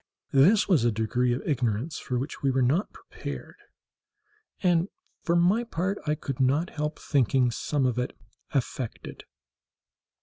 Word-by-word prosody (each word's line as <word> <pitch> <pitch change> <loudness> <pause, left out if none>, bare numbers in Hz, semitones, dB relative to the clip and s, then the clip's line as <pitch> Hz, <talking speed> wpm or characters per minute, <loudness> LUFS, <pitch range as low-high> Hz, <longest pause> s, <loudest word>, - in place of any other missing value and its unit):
This 175 +11 +5
was 170 - +4
a 120 - +3
degree 115 +3 0
of 120 - -2
ignorance 125 +1 -1
for 125 - -3
which 135 +5 -4
we 140 - +2
were 130 0 +2
not 150 - +1
prepared, - - -8 1.1
and 175 0 +3 0.3
for 170 - +1
my 185 +7 +4
part 195 -3 -2
I 150 - +2
could 135 -3 -5
not 140 +7 +2
help 150 0 -3
thinking 130 -3 +2
some 140 +3 -1
of 125 -1 +1
it 125 - -3 0.3
affected. 130 -3 -4
140 Hz, 145 wpm, -27 LUFS, 125-170 Hz, 1.1 s, This